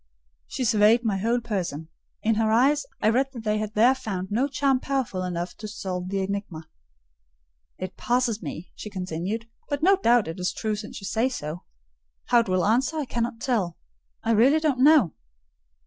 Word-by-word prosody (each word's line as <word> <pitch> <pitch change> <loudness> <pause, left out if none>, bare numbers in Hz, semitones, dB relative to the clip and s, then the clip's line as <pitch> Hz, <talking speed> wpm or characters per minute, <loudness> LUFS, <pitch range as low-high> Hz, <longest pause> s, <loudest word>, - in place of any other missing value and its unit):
She 255 - -3
surveyed 220 +2 +4
my 205 -3 +1
whole 235 +4 +1
person: 175 -8 -3 0.3
in 225 - +3
her 220 0 +1
eyes 275 +6 +3 0.2
I 215 - +5
read 260 +4 +2
that 235 -3 -8
they 215 -1 0
had 215 0 -4
there 235 +5 +6
found 195 -7 -5
no 245 +7 +2
charm 270 -1 +1
powerful 260 -9 -2
enough 175 -1 -3
to 215 - -7
solve 185 -3 -4
the 195 0 -1
enigma. 190 -5 -5 1.1
"It 185 - -6
passes 240 -3 0
me!" 160 +1 -7
she 210 - -8
continued; 185 +4 -4 0.2
"but 285 +1 -2
no 390 +2 +6
doubt 240 - +3
it 165 +3 -6
is 180 - -1
true 215 -1 -2
since 210 0 -8
you - - -7
say 230 +6 +1
so. 160 - -6 0.6
How 240 - +6
it 230 -4 -1
will 185 -1 +2
answer, 250 +8 +2
I 300 - -1
cannot 235 -1 -3
tell: 210 - -1 0.5
I 225 - +1
really 255 +8 +5
don't 300 -5 0
know. 290 - +6
220 Hz, 185 wpm, -25 LUFS, 190-250 Hz, 1.1 s, there